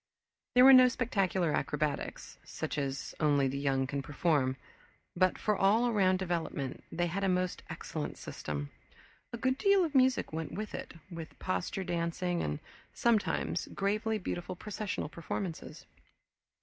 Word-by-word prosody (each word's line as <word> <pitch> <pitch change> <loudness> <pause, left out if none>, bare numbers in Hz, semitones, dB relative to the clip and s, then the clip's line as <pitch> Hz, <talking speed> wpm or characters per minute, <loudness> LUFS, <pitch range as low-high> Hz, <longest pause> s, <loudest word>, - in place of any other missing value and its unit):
There 250 +1 +8
were 270 - +10
no 255 -1 +9
spectacular 195 -9 0
acrobatics, 150 +1 -2
such - - -4
as 135 -1 -3
only 145 -3 +3
the 135 +1 -2
young 135 -1 +1
can 140 +1 -3
perform, 140 -3 +1 0.6
but 185 +1 +3
for 210 - +1
all 210 +5 +4
around 190 -5 +3
development 165 -7 -3
they 175 +1 0
had 185 +4 -2
a 195 - +2
most 180 0 0
excellent - - -5
system. 70 -1 -5 0.6
A 235 - -4
good 260 +3 0
deal 395 -2 +4
of 310 - -5
music 260 - +3
went 160 -1 -4
with 210 +2 -5
it, - - -6 0.2
with 165 -2 -8
posture 95 - -2
dancing 175 0 -1
and, 75 - -2 0.3
sometimes, 230 -3 +1
gravely 215 +2 0
beautiful 180 -2 -4
processional 210 -1 -4
performances. 170 +2 -5
180 Hz, 145 wpm, -32 LUFS, 150-215 Hz, 0.6 s, were